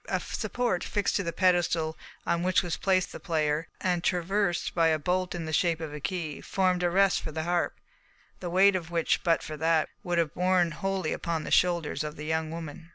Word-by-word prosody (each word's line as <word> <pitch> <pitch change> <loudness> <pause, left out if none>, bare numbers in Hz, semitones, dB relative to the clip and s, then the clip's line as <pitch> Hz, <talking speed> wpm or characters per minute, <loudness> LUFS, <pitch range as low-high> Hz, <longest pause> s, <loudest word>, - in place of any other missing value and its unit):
A - - +1
support, 245 -7 -2
fixed 205 -1 -1
to - - 0
the 170 - -2
pedestal 170 -3 +2 0.3
on 170 - +1
which 185 +1 +2
was 175 -2 -2
placed 185 -2 +1
the - - -8
player, 155 -3 0
and 180 -2 0
traversed 180 +1 0
by 165 -1 +3
a 160 -1 +3
bolt 180 +4 -1
in 170 -2 -4
the 155 - -5
shape 165 0 +2
of 160 -3 -6
a 150 - -6
key, 155 -2 -4
formed 185 -2 +1
a 175 - +2
rest 195 +1 +3
for 155 - -5
the 160 +1 -3
harp, 175 +1 -1 0.6
the 180 - -4
weight 190 +3 +5
of 170 -3 -3
which, 170 -1 +1
but 165 -2 +2
for 155 -1 -6
that, 160 0 +2
would 175 -3 -2
have 165 -2 +1
borne 180 -1 +2
wholly 190 0 -2
upon 165 -2 -2
the - - -6
shoulders 170 -4 +2
of 150 0 -5
the 150 - -7
young 160 0 -1
woman. 165 0 -7
170 Hz, 220 wpm, -28 LUFS, 160-185 Hz, 0.6 s, weight